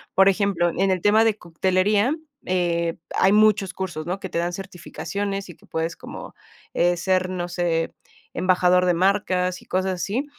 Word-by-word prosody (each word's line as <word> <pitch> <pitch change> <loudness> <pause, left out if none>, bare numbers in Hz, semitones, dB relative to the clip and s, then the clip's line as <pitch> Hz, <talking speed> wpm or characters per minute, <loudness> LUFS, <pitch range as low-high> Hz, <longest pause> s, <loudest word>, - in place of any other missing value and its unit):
por 195 0 +6
ejemplo, 195 -3 +2
en 195 0 +1
el 185 -2 0
tema 215 +2 +5
de 220 -2 +2
coctelería, 190 - +1 0.3
eh, 170 -2 0 0.2
hay 190 - +4
muchos 210 -3 +3
cursos, 175 -5 -4
¿no? 185 +2 -2
Que 190 - -6
te 170 - -2
dan 175 +1 -1
certificaciones, 195 +2 -5
y 175 - -10
que - - -23
puedes 165 +1 -3
como, - - -9 0.4
eh, 175 0 +2
ser, 185 +1 +1
no 175 -1 -3
sé, 170 -2 -1 0.4
embajador 180 0 +3
de 180 - +3
marcas 185 -1 +1
y - - -18
cosas 185 0 -1
así. 200 - -2
185 Hz, 175 wpm, -23 LUFS, 175-195 Hz, 0.4 s, por